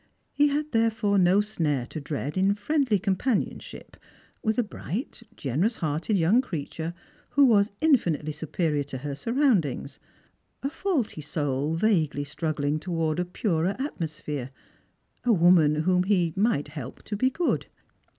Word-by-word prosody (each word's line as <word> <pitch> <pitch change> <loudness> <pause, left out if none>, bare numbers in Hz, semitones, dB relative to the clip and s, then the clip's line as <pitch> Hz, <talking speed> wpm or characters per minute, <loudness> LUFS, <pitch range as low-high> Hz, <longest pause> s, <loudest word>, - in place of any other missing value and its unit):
He 290 0 +4
had 295 +1 -1
therefore 225 -3 +2
no 185 +3 +5
snare 155 - -1
to 155 - -7
dread 145 0 -4
in 195 +2 +3
friendly 250 +1 +1
companionship 195 +5 -2 0.4
with 220 +1 0
a 245 - +3
bright 215 - -5
generous 160 - 0
hearted 160 +6 -1
young 185 +9 +4
creature 165 - -5 0.4
wlio 285 - +8
was 210 -4 +4
infinitely 175 - +2
superior 155 0 -1
to 135 -1 -6
her 140 +2 -5
surroundings, 195 - 0 0.6
a 275 - -1
faulty 310 - -1
soul 145 0 -1
vaguely 165 -7 +1
struggling 150 0 -2
towards 165 -1 -1
a - - -2
purer 180 0 0
atmosphere, 155 - -4 0.7
a 245 - +3
woman 170 -5 +5
vinom 180 +1 +2
he 180 -5 +2
might 190 -9 +1
help 140 -4 -8
to 210 - -4
be 255 +6 +2
good. 335 +6 -1
180 Hz, 140 wpm, -26 LUFS, 150-225 Hz, 0.7 s, wlio